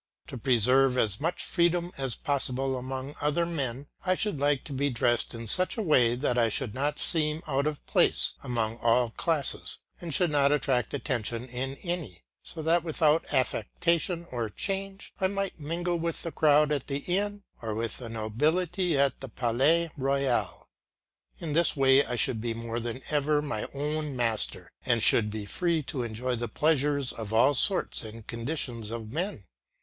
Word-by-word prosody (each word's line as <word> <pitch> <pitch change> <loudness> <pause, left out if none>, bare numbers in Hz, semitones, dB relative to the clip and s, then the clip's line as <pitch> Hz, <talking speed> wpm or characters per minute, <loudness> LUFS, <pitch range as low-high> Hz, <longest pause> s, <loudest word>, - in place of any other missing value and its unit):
To - - -6
preserve 130 +2 +4
as 110 -3 +1
much 165 +3 -1
freedom 175 0 +1
as 135 -3 -1
possible 135 -1 -1
among 130 +2 -5
other 150 +3 +1
men, 140 -5 -3 0.2
I 185 -1 +2
should 205 -7 -1
like 145 -1 +1
to 145 - -8
be 140 +2 0
dressed 120 -1 0
in 115 0 -6
such 185 - +2
a 220 - -1
way 125 - +4
that 125 -1 0
I 115 -1 +3
should 110 0 -2
not 145 +3 -1
seem 155 -1 0
out 140 -1 0
of 150 -2 -4
place - - +3
among 115 -2 -2
all 120 0 +2
classes, 155 +1 -1 0.2
and 170 -2 -5
should 175 +2 +2
not 140 -1 +3
attract 135 -5 +1
attention 120 -4 -2
in 130 +2 -4
any; 170 - -4 0.2
so 160 - -8
that 165 +1 +3
without 160 -1 +1
affectation 170 - 0
or 120 -3 -2
change 195 - -4
I 190 - +4
might 195 -2 -3
mingle 170 +3 -2
with 165 0 -3
the 165 - -4
crowd 150 -1 +4
at 145 -3 -1
the 140 0 -3
inn 205 +3 0 0.2
or 110 -2 -3
with 115 -1 -3
the 120 -3 -7
nobility 155 - 0
at 140 0 +2
the 135 - -8
Palais 135 +9 +2
Royal. 135 -2 0 0.7
In 160 -3 -4
this 165 -1 +3
way 135 0 +5
I 125 - -3
should 115 -1 +1
be 115 0 -2
more 115 0 -4
than 120 +2 -5
ever 150 0 +2
my 140 -8 -3
own 150 0 -2
master, 110 -6 -1
and 120 -3 +2
should 105 -2 +4
be 105 -1 -5
free 170 - 0
to 130 -1 -3
enjoy 120 +2 -2
the 120 0 -3
pleasures 145 +1 +1
of 110 -2 -7
all 115 +6 +5
sorts 185 +8 +2
and 110 0 -9
conditions 115 -2 -4
of 115 -1 -6
men. 175 - -3
140 Hz, 175 wpm, -28 LUFS, 120-160 Hz, 0.7 s, way